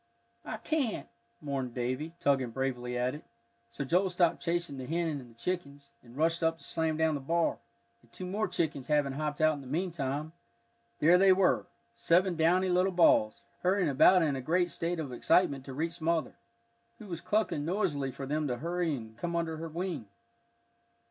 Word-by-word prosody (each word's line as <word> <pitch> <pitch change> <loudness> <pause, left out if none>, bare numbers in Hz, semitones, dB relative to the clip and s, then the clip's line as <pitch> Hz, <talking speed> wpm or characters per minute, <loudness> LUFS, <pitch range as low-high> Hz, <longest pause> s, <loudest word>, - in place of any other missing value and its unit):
"I 220 - -4
can't," 270 -1 -1 0.3
mourned 135 -4 -3
Davie, 130 +6 -2
tugging 135 -3 +2
bravely 125 -1 -3
at 125 +1 0
it. 150 - -9 0.5
So 125 +4 -5
Joel 180 +7 +2
stopped 175 -2 +1
chasing 170 -5 -2
the 130 - -6
hen 170 +2 0
and 120 -2 -15
the - - -33
chickens, 140 -3 -4
and 120 +1 -15
rushed 165 +2 +1
up 165 0 +1
to - - -16
slam 160 -1 -1
down 160 0 +2
the 145 - -3
bar, 165 +4 0 0.4
and 120 - -26
two 185 - -7
more 200 +4 -1
chickens 150 -5 -2
having 145 -2 +2
hopped 150 +1 -3
out 155 0 +5
in 145 - -7
the 135 - -11
meantime, 155 -1 -2 0.6
there 170 +6 +5
they 195 0 +6
were 180 - +3 0.3
seven 175 +9 +2
downy 175 +4 +3
little 180 +2 +3
balls, 165 -11 +3 0.2
hurrying 185 -2 +2
about 175 +6 +6
in 145 -3 +1
a 130 - -3
great 175 +6 +1
state 170 +1 -2
of 140 -5 -4
excitement 140 0 +2
to 135 - -7
reach 165 +3 -3
mother, 165 0 0 0.6
who 220 - -11
was 170 -4 -6
clucking 210 -8 0
noisily 160 -6 -1
for 135 +2 -7
them 150 +2 -1
to 125 -2 -2
hurry 170 +1 -1
and 110 -3 -10
come 170 +6 -3
under 165 -1 -1
her 165 +1 -5
wing. 165 - -4
160 Hz, 190 wpm, -30 LUFS, 135-175 Hz, 0.6 s, they